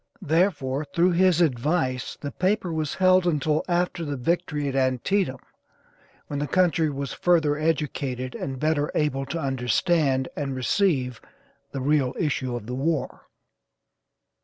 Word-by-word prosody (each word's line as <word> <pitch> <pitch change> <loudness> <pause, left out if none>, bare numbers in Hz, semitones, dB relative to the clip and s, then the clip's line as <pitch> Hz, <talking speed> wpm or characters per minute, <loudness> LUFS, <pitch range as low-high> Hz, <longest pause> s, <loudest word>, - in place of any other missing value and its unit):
Therefore, 155 -4 +1
through 175 +4 +2
his 180 -1 +3
advice 130 -3 0
the 145 - -5
paper 185 0 0
was 155 -2 -2
held 185 -1 +4
until 155 -1 +1
after 175 -1 0
the 145 -3 -3
victory 150 +1 -1
at 135 - -3
Antietam, 130 +4 +1 0.9
when 145 - -4
the 145 - -2
country 170 -3 +2
was 140 -1 -4
further 160 -4 +2
educated 140 -5 -2
and 135 -2 -5
better 155 0 0
able 135 -3 0
to 170 - -3
understand 135 +1 +1
and 140 -2 -3
receive 130 - 0 0.5
the 135 - -4
real 140 -2 +1
issue 135 -6 -1
of 120 -3 -6
the 125 - -5
war. 150 +4 -2
150 Hz, 135 wpm, -25 LUFS, 135-170 Hz, 0.9 s, held